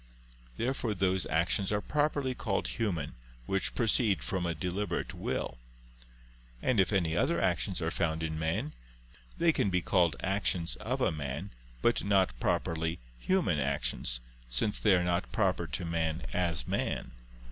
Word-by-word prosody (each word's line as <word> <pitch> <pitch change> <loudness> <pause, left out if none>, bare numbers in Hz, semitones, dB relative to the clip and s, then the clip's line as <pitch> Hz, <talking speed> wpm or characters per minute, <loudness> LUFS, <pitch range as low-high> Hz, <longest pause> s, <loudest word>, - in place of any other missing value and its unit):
Therefore 120 -3 -1
those 95 0 +1
actions 85 +5 +1
are 105 - +2
properly 145 +1 0
called 110 -5 -1
human 90 -11 -2 0.3
which 95 +6 0
proceed 110 - +3
from 90 +7 -1
a 85 - -1
deliberate 90 +6 -2
will. - - -3 1.0
And 120 - +1
if 95 -2 +3
any 85 -5 +1
other 85 0 +2
actions 90 +1 0
are 80 - 0
found 80 -3 0
in 80 -1 -2
man, 80 -1 -1 0.6
they 165 -1 +4
can 100 - +1
be 90 -1 +2
called 85 -2 +3
actions 95 -3 0
"of - - -2
a - - +3
man," 75 +4 -4 0.3
but 120 - +3
not 100 -5 +3
properly 80 0 0 0.2
"human" 175 - +1
actions, - - 0 0.3
since 60 - +1
they 105 -3 +5
are 90 - +2
not 85 -8 0
proper - - +1
to 90 - -3
man 80 -1 -1
as 85 -7 +1
man. - - -1
90 Hz, 150 wpm, -31 LUFS, 80-100 Hz, 1.0 s, they